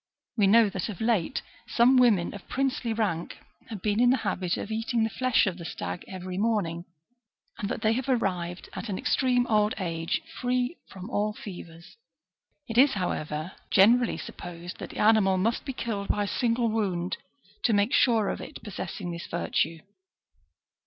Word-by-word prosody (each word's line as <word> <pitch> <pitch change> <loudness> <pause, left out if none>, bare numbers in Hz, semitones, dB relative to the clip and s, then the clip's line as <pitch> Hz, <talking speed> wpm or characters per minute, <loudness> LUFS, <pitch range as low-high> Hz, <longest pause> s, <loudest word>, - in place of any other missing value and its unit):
We 205 -4 +4
know 225 +2 +6
that 190 0 -3
of 200 - -6
late 220 -2 0 0.2
some 245 +3 +4
women 230 -9 +4
of 200 - -11
princely 260 -3 -1
rank 205 -7 -1 0.3
have 210 -5 -7
been 210 0 +1
in 245 0 +5
the 260 - +4
habit 185 -2 -1
of 215 - -5
eating 225 +1 0
the 220 - 0
flesh 255 0 +2
of 185 -2 -2
the - - -7
stag 170 - -5
every 185 0 -5
morning, 195 -6 0 0.7
and 200 - -2
that - - -4
they 220 +1 +4
have 255 +3 -2
arrived 180 -7 -1
at 235 - -6
an 190 - -2
extreme 250 +2 +2
old 215 -2 +2
age, 165 - -2 0.2
free 250 +4 0
from 190 0 -9
all 210 -1 0
fevers. 175 - -10 0.7
It 230 0 +1
is, 270 +1 +6
however, 155 -3 -3 0.2
generally 235 +5 +5
supposed 175 0 -8
that - - -6
the - - -10
animal 210 -3 +4
must 225 +9 0
be 275 - -2
killed 210 -5 -3
by 205 - +1
a - - -2
single 235 +1 +1
wound 190 -5 -1 0.5
to - - +4
make 205 +3 +2
sure 225 -5 +4
of - - -3
it - - -9
possessing 190 -3 -5
this 170 0 -6
virtue. 165 -1 -1
210 Hz, 175 wpm, -27 LUFS, 180-230 Hz, 0.7 s, know